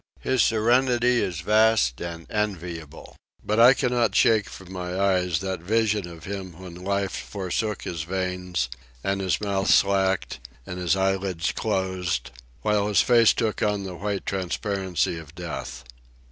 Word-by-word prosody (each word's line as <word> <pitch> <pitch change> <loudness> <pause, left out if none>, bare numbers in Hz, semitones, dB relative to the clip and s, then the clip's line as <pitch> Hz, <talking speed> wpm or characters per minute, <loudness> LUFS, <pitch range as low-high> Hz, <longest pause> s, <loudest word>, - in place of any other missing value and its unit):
His 130 -2 +2
serenity 120 +2 +3
is 85 -3 -2
vast 105 - +3
and 85 -1 -6
enviable. 90 -7 -4 0.3
But 105 +2 +1
I 125 +3 +8
cannot 120 -5 +1
shake 110 -3 +4
from 95 -1 -11
my 90 0 -4
eyes 90 -4 +1
that 95 -2 -3
vision 105 +1 +1
of 85 -2 -11
him 95 -3 -6
when 90 -2 -9
life 100 +2 -2
forsook 100 +1 -3
his 85 -3 -4
veins, 90 -4 -2 0.4
and 95 0 -1
his 95 -1 0
mouth 100 -2 -1
slacked, 95 -1 +2 0.3
and 90 - -6
his 90 +1 +2
eyelids 95 -3 0
closed, 95 - -2 0.3
while 105 -1 +2
his 105 - +4
face 120 -2 +5
took 110 -2 -1
on 105 -1 +1
the 95 -1 -6
white 100 +2 -3
transparency 95 -2 -1
of 80 0 -13
death. 70 -8 -6
95 Hz, 145 wpm, -25 LUFS, 90-105 Hz, 0.4 s, I